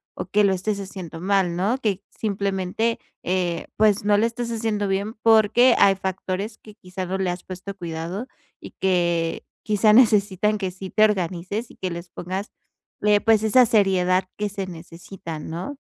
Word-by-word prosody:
o - - -5
que 210 0 +3
lo 195 - +4
estés 200 +2 -2
haciendo 185 -4 -8
mal, 190 -2 +1
¿no? 205 +8 +1
Que 205 -6 -1
simplemente, 200 +2 -1 0.2
eh, 180 -2 -1
pues, 210 -2 +3
no 205 0 +4
lo 215 - +3
estés 235 0 -3
haciendo 220 -3 -1
bien, 200 +3 -1
porque 225 +2 +5
hay 195 -1 +6
factores 190 +3 -4
que, 215 - -14
quizá, 185 -2 -6
no 190 +2 -2
le 190 -1 -1
has 175 0 -7
puesto 190 +2 -8
cuidado 170 +6 -5 0.3
y - - -11
que, 170 -3 0 0.2
quizá, 215 0 +3
necesitan 210 -3 +4
que 190 -3 -3
sí 190 +1 -8
te 215 - +4
organices, 190 +2 -2
y - - -18
que 185 - -3
les 170 +1 -7
pongas, 185 +4 -5 0.5
eh, 210 -1 +4
pues, 220 -1 +3
esa 245 +3 +5
seriedad 190 -4 +2
que 210 0 -1
se 195 -1 -5
necesita, 170 -1 -9
¿no? 175 - -6
195 Hz, 175 wpm, -23 LUFS, 180-215 Hz, 0.5 s, hay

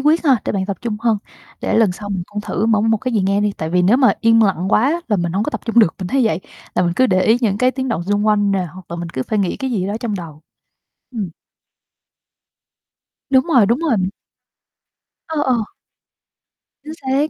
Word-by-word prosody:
quyết 310 +4 +2
ha, 270 -4 +5
để - - -1
bạn 190 -2 -1
tập 200 -1 -3
trung 230 -3 -3
hơn. 225 -3 +2 0.4
Để - - -1
lần 215 -5 +3
sau 205 +3 -8
mình 190 -3 -2
cũng 210 0 -5
thử 205 +1 -2
mở 220 -2 +3
một 225 +1 +2
cái 255 +3 -4
gì 215 - +2
nghe 195 +2 +1
đi, 205 -1 +1
tại 160 0 -3
vì 180 +1 +2
nếu 205 +8 +4
mà 260 -2 +4
yên 225 0 +5
lặng 190 -4 +1
quá 275 +12 +2
là 210 - +2
mình 170 -2 -2
hổng 195 +3 0
có 260 - -2
tập - - -4
trung 230 0 +1
được, 195 -8 +5
mình 185 -2 -4
thấy 265 +1 +2
vậy, 185 -5 0 0.3
là - - +2
mình 175 -1 +1
cứ 260 - +4
để 185 -4 +2
ý 220 +4 +4
những 205 -4 0
cái 255 +2 +3
tiếng 260 0 -4
động 225 -8 -1
xung 205 +2 0
quanh 205 -1 +3
nè, 185 -2 0
hoặc 185 -1 -13
là 170 - -4
mình 170 0 -5
cứ 130 -6 -3
phải 215 - -2
nghĩ 190 -3 0
cái 265 -1 -3
gì 195 -6 -1
đó 200 - -3
trong 225 -4 -2
đầu. 160 -5 -8 0.7
Ừm. 215 -7 -4 2.0
Đúng 265 0 +4
rồi, 260 -11 +4
đúng 235 +6 +1
rồi. 235 - +1 1.2
Ờ, 315 -2 -2
ờ. 255 - +2 1.3
Chính 305 +1 -7
xác. 275 +3 0
210 Hz, 235 wpm, -19 LUFS, 190-250 Hz, 2.0 s, ha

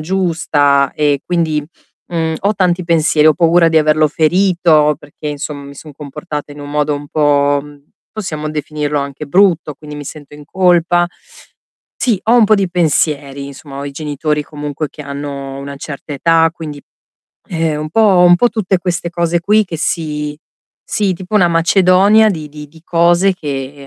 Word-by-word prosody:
giusta 155 -6 +1
e 145 -2 +1
quindi, 160 -4 0 0.5
mhmm, 160 -2 -1
ho 205 +2 +1
tanti 180 -1 0
pensieri, 160 -2 +3
ho 155 - +6
paura 170 0 +4
di 160 - 0
averlo 155 0 +3
ferito 160 -2 +2
perché, 145 +1 -11
insomm 145 -1 -6
mi 140 - -11
son 150 +1 -12
comportata 150 +1 -7
in 145 - -11
un 145 0 -8
modo 150 0 0
un 145 0 -7
po' 145 -1 +2
mhmm, 145 -1 -15 0.3
possiamo 155 -8 -5
definirlo 150 -1 -3
anche 140 +1 -5
brutto, 170 -3 +2
quindi 150 0 -11
mi 145 - -7
sento 145 0 -10
in 150 0 -12
colpa. 175 -1 +2 0.9
Sì, 230 -6 +1
ho 230 +2 +3
un 230 - +6
po' 215 +1 +4
di 195 -3 0
pensieri, 145 -5 0
insomma, 140 0 -10
ho 140 - -5
i 140 - -5
genitori 150 0 -2
comunque 150 0 -5
che 150 - -11
hanno 140 -1 -6
una 140 0 -7
certa 145 +1 -8
età, 165 +3 +3
quindi, 150 -4 -8 0.7
ehm, 160 -3 -1
un 155 - -4
po' 220 +5 +3
un 175 0 +7
po' 245 - +3
tutte 195 -4 0
queste 175 -1 -3
cose 170 0 0
qui 210 +4 +3
che 175 -3 -6
si 150 -3 -2 0.5
sì, 205 -4 0
tipo 185 +4 -8
una 180 -4 +4
macedonia 190 +5 +4
di 155 -5 -5
di 150 0 -10
di 160 +2 -18
cose 175 +3 +3
che, 140 -3 -6
155 Hz, 175 wpm, -15 LUFS, 145-175 Hz, 0.9 s, un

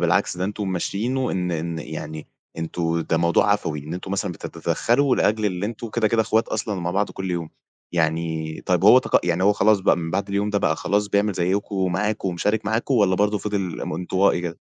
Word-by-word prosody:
بالعكس 90 +2 +1
ده 90 - -2
أنتم 105 +1 -3
ممشيينه 115 +8 -1
إن 90 -1 -1
إن 85 0 -3
يعني 80 -1 -7 0.3
أنتم 85 0 -1
ده 80 - 0
موضوع 85 +4 +3
عفوي، 80 -7 -2
إن 75 +4 -6
أنتم 95 +1 -6
مثلًا 100 -2 -1
بت - - -7
بتتدخلوا 130 +3 +1
لأجل 105 0 +1
اللي 95 +1 -2
أنتم 115 +1 -6
كده 110 -1 +1
كده 115 0 +2
إخوات 110 +1 +1
أصلًا 105 -1 -2
ومع 90 -1 -2
بعض 100 +3 0
كل 95 -1 -5
يوم. 85 -2 -3 0.4
يعني 80 -1 -1
طيب 90 +1 +2
هو 120 +5 +9
تق - - +2
يعني 85 +1 +1
هو 100 +2 +5
خلاص 105 0 +3
بَقى 95 - +3
من 80 -1 -4
بَعد 100 +3 -1
اليوم 100 +1 0
ده 100 - +1
بَقى 80 -2 +1
خلاص 105 0 0
بيعمل 100 +1 +2
زيّكم 95 +3 -1
ومعاكم 95 +3 0
ومشارك 105 +5 -1
معاكم 115 +5 0
والّا 100 -5 +4
برضه 105 +2 +2
فِضِل 100 -4 -3
م - - -4
إنطوائي 90 +2 +1
كده؟ 85 -2 -5
95 Hz, 210 wpm, -23 LUFS, 85-105 Hz, 0.4 s, هو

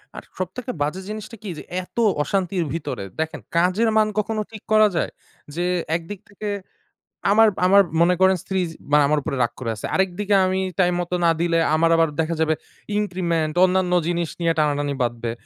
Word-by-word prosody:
আর - - -8
সব 185 - -1
থেকে 250 0 -4
বাজে 150 +6 -1
জিনিসটা 215 +1 -7
কী? 205 - -5
যে - - -8 0.2
এত 180 - -20 0.3
অশান্তির 185 -1 -1
ভেতরে 150 -11 -4
দেখেন 160 0 -2 0.2
কাজের 185 +7 +3
মান 215 - +4
কখনো 215 +1 -1
ঠিক 215 -2 -10
করা 215 0 +6
যায়? - - 0 0.4
যে 175 +1 -1 0.3
একদিক 170 +4 -5
থেকে 205 +1 -5 0.8
আমার 225 +1 +6 0.2
আমার 200 +2 +7 0.2
মনে 180 +1 +4
করেন 190 0 +5
স্ত্রী 190 0 -2
য - - -3 0.3
মানে 150 0 +6
আমার 150 +1 +2
ওপরে 140 -2 -3
রাগ 120 - 0
করে 115 - -2
আছে। 105 - -5
আরেকদিকে 190 +2 +1
আমি 185 0 0 0.2
টাইমমতো 175 -1 +1
না 170 - +5
দিলে 170 -1 +2 0.2
আমার 165 +1 +3
আবার 165 0 +3
দেখা 160 +1 0
যাবে 160 0 +2 0.4
increment, 170 -6 -1
অন্যান্য 185 -1 +1 0.2
জিনিস 170 -2 -1
নিয়ে 165 -1 +2
টানাটানি 145 -1 +1
বাধবে। 120 -1 -2
180 Hz, 185 wpm, -22 LUFS, 160-195 Hz, 0.8 s, আমার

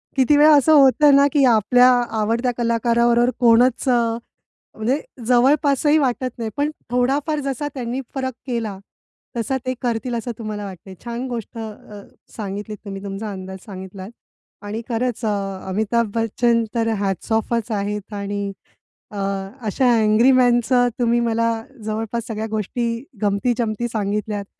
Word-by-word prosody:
किती 270 +2 +4
वेळा 300 +1 +7
असं 300 +3 +4
होतं 285 0 +6
ना, 280 0 +6
की 290 -2 +4
आपल्या 245 +2 +5 0.3
आवडत्या 230 +4 +1
कलाकाराबरोबर 235 +1 +2
कोणच 245 +2 +4
अ, 245 - +4 0.8
म्हणजे 240 +6 0 0.3
जवळपासही 280 +4 +3
वाटत 255 -3 0
नाही, 230 -2 -3
पण 290 +1 0 0.2
थोडाफार 275 +5 +1
जसा 275 +2 -2
त्यांनी 250 0 -3
फरक 260 -1 -2
केला, 225 -5 -3 0.6
तसा 250 +4 -1
ते 255 - 0
करतील 240 0 -2
असं 235 +1 -3
तुम्हाला 215 -2 -5
वाटतं 190 -1 -10
आहे. 190 - -9
छान 240 +2 -4
गोष्ट 235 -1 -6
अ, 215 -2 -8 0.4
सांगितलीत 210 +1 -5
तुम्ही 195 -1 -7
तुमचा 200 +2 -5
अंदाज 190 -1 -7
सांगितलात. 190 -1 -8 0.5
आणि 210 +2 -5
खरंच 240 0 -2
अ, 195 -3 -3
अमिताभ 220 +3 0
बच्चन 230 +1 +1
तर 230 -1 +1
हॅट्स 195 +1 -3
ऑफच 225 +1 0
आहेत 210 0 -3
आणि 200 0 -3 0.6
अ, 210 - -8 0.5
अशा 245 +5 +2
अँग्री 220 +4 +4
मॅनचं 245 -1 +3
तुम्ही 240 0 +2
मला 230 0 +1 0.4
जवळपास 225 +1 -3
सगळ्या 220 -2 -3
गोष्टी, 230 +3 -2 0.2
गमती-जमती 220 +2 0
सांगितल्यात. 210 -1 -2
230 Hz, 140 wpm, -21 LUFS, 210-250 Hz, 0.8 s, वेळा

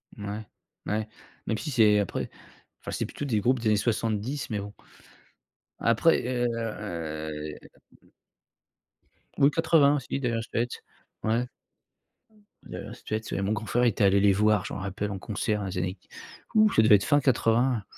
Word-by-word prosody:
Mouais. 105 +1 -6 0.4
Mouais, 110 +1 -1 0.4
même 110 - 0
si 150 - -5
c'est 110 -5 +5
après 100 - -2 0.5
enfin, - - -7
c'est - - -2
plutôt 145 - -6
des 110 -6 0
groupes 125 +3 +2
des 115 - -2
années 105 - +4
70, 115 +5 -1
mais 105 -2 -2
bon 100 +1 -6 1.1
après 115 +9 +3
et 125 0 -1
heu, - - +2
m 80 -9 -5 0.3
m - - -26 1.3
oui 140 +2 +5
80 155 -3 +4
aussi, 135 0 -3
Dire 120 -3 -1
Straits, 120 +2 -3 0.4
ouais. 115 +3 +1 1.2
Dire - - -8
Straits, 110 +1 -5
ouais, 100 - -1
mon 100 +2 0
grand 110 +1 -4
frère 120 +3 +1
était 110 -3 +2
allé 100 0 +5
les 100 0 +5
voir, 105 -1 +2
je - - -5
m'en - - -4
rappelle 100 +2 -3
en 95 - -5
concert 105 +1 -2
dans 100 - -4
les 90 0 -5
années 90 +1 -2
q - - -32 0.5
ouh! 215 -1 +6
Ça - - +4
devait 110 -1 +7
être 100 - +2
fin 145 -1 +4
80, 120 -3 +2
110 Hz, 175 wpm, -27 LUFS, 100-120 Hz, 1.3 s, devait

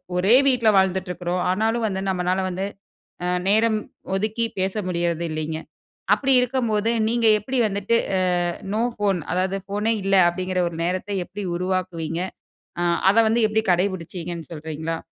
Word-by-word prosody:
ஒரே 195 +7 +5
வீட்ல 240 -4 +4
வாழ்ந்துட்டு 190 -1 +1
இருக்றோம். 180 0 -2
ஆனாலு 220 +4 +1
வந்து, 190 -1 -3
நம்மனால 180 0 0
வந்து, 185 +2 -3 0.6
அ - - 0 0.2
நேரம் 220 +1 +3 0.4
ஒதுக்கி 215 +4 0
பேச 190 0 0 0.2
முடியறதில்லீங்க. 165 -2 -2 0.6
அப்டி 270 +4 0
இருக்கம்போது, 235 -4 0 0.2
நீங்க 235 0 +1
எப்டி 255 +5 -3
வந்துட்டு 200 +3 0 0.2
ஆ - - +1 0.5
நோ 220 - +1
ஃபோன், 200 -4 +1
அதாது 185 +2 0
ஃபோனே 210 +3 0
இல்ல, 195 0 +2
அப்டிங்கிற 185 +1 -1
ஒரு 165 - -9
நேரத்த 185 +3 -2 0.2
எப்டி 205 +1 -7
உருவாக்குவீங்க? 175 -3 -2 0.6
ஆ - - 0 0.3
அத 205 - 0
வந்து 230 +2 +2
எப்டி 220 +1 +1
கடைப்பிடிச்சீங்கன்னு 175 -2 -3
சொல்றீங்களா? 160 +1 -4
190 Hz, 140 wpm, -23 LUFS, 175-215 Hz, 0.6 s, ஒரே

